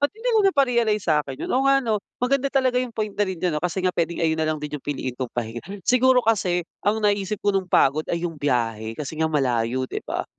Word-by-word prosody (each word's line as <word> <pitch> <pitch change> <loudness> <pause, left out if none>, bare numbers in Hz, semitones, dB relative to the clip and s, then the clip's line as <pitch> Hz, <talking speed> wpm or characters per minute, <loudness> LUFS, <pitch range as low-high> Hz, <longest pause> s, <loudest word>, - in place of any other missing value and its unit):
ba't 285 - +2
hindi - - -3
mo 440 - +5
na 390 - +5
pa-realize 235 -7 +2
sa'kin 150 -4 0
yun? - - -5
Oo 270 +2 +2
nga 275 - +6
'no, 215 -2 0 0.2
maganda 275 +2 +1
talaga 260 -2 +2
yung 255 - -2
point 215 -2 -3
na 205 - -6
ring 190 - -3
ganun 165 -3 -1
kasi 180 +2 -2
nga 180 - +2
pwedeng 170 0 -1
ayun 160 0 +1
na 155 - +1
lang 155 - 0
din 150 -1 -6
yung - - -59
piliin 135 -3 -3
kong 125 0 -4
pahinga. 115 0 -3 0.2
Siguro 250 -1 +4
kasi 180 -6 +1 0.2
ang 215 +2 0
naisip 205 0 +1
ko 205 - +3
nung 190 -2 -1
pagod 155 -1 +3
ay 170 0 -2
'yung 165 -4 -5
biyahe 115 -5 -1
kasi 150 0 -5
nga 160 - +2
malayo 130 -3 0
'di - - -5
ba. - - -2
180 Hz, 250 wpm, -23 LUFS, 145-225 Hz, 0.2 s, nga